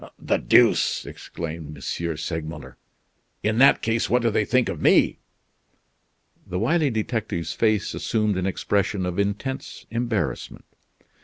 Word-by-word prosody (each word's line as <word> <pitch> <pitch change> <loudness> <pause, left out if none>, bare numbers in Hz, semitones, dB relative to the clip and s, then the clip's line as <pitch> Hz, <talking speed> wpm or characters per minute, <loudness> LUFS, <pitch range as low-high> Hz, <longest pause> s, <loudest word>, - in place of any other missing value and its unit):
"The - - 0
deuce!" - - +3
exclaimed 80 -2 -7
M. 85 +3 -3
Segmuller; 80 0 -5 0.7
"in 110 +2 +1
that 135 - +6
case, 115 0 0
what 125 +1 +2
do 115 - +2
they 105 - +1
think 125 +2 +2
of - - -4
me?" - - +4 1.3
The 90 - -3
wily 145 - +2
detective's 110 - -2
face 110 -3 +1
assumed 105 -2 0
an 95 0 -1
expression 100 0 0
of 90 +2 -3
intense 105 +7 -3
embarrassment. 115 -2 -2
105 Hz, 130 wpm, -24 LUFS, 85-115 Hz, 1.3 s, that